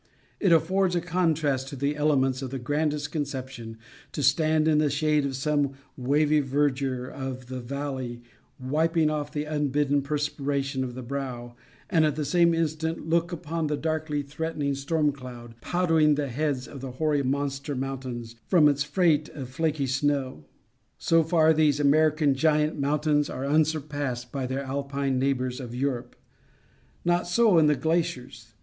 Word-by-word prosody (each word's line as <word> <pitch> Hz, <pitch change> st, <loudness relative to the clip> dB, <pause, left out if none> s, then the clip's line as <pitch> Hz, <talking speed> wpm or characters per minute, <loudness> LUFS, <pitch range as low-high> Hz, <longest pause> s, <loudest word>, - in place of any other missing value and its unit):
It 190 Hz, -, +2 dB
affords 180 Hz, +3 st, +3 dB
a -, -, +3 dB
contrast 160 Hz, -6 st, 0 dB
of -, -, -6 dB
the 140 Hz, +2 st, 0 dB
elements 135 Hz, -3 st, +1 dB
of 130 Hz, -, -4 dB
the 135 Hz, -, -4 dB
grandest 145 Hz, +3 st, -1 dB
conception 130 Hz, -6 st, -5 dB, 0.4 s
to 145 Hz, -, -2 dB
stand 155 Hz, +3 st, +3 dB
in 155 Hz, -1 st, +4 dB
the 150 Hz, -1 st, +2 dB
shade 150 Hz, 0 st, +1 dB
of 135 Hz, -, -4 dB
some 145 Hz, 0 st, 0 dB, 0.2 s
wavy 150 Hz, +4 st, +2 dB
verdure 135 Hz, -2 st, 0 dB
of 130 Hz, -2 st, -6 dB
the 130 Hz, 0 st, -4 dB
valley 130 Hz, -2 st, -5 dB, 0.4 s
wiping 155 Hz, +4 st, +1 dB
off 150 Hz, -1 st, -3 dB
the 150 Hz, -, -2 dB
unbidden 145 Hz, -1 st, +1 dB
perspiration 140 Hz, -1 st, -2 dB
from 125 Hz, -2 st, -4 dB
the 130 Hz, -, -6 dB
brow, 120 Hz, -2 st, -5 dB, 0.3 s
and, 165 Hz, -4 st, +3 dB
at 150 Hz, -2 st, +1 dB
the 150 Hz, -1 st, -2 dB
same 170 Hz, +1 st, +3 dB
instant, 160 Hz, 0 st, -2 dB
look 170 Hz, +1 st, +1 dB
upon 165 Hz, -2 st, -3 dB
a 150 Hz, -, 0 dB
darkly 155 Hz, -2 st, -2 dB
threatening 150 Hz, 0 st, -3 dB
storm 150 Hz, +2 st, 0 dB
cloud 125 Hz, -4 st, -10 dB
powdering 165 Hz, -4 st, +3 dB
the 145 Hz, -1 st, -2 dB
heads 135 Hz, 0 st, -2 dB
of 140 Hz, -, -9 dB
the 130 Hz, -2 st, -6 dB
hoary 150 Hz, +1 st, +1 dB
monster 140 Hz, +1 st, -2 dB
mountains 130 Hz, -3 st, -5 dB
from 165 Hz, -5 st, +5 dB
its 145 Hz, -1 st, +2 dB
freight 150 Hz, +1 st, +2 dB
of 130 Hz, -4 st, -8 dB
flaky 150 Hz, +1 st, -1 dB
snow. 130 Hz, -, -1 dB, 0.5 s
So 165 Hz, 0 st, +3 dB
far 160 Hz, -1 st, +4 dB
these 150 Hz, -2 st, +3 dB
American 150 Hz, 0 st, +3 dB
giant 150 Hz, +2 st, +1 dB
mountains 150 Hz, +1 st, +1 dB
are 130 Hz, -, -4 dB
unsurpassed 145 Hz, -4 st, -1 dB
by 135 Hz, -2 st, -3 dB
their 135 Hz, +2 st, -3 dB
Alpine 140 Hz, 0 st, -2 dB
neighbors 130 Hz, -1 st, -1 dB
of 120 Hz, -2 st, -7 dB
Europe. 125 Hz, -2 st, -2 dB, 0.9 s
Not 175 Hz, 0 st, +2 dB
so 200 Hz, -1 st, +4 dB
in 155 Hz, -, +5 dB
the 150 Hz, -, +4 dB
glaciers. 125 Hz, -9 st, -2 dB
145 Hz, 160 wpm, -26 LUFS, 135-155 Hz, 0.9 s, from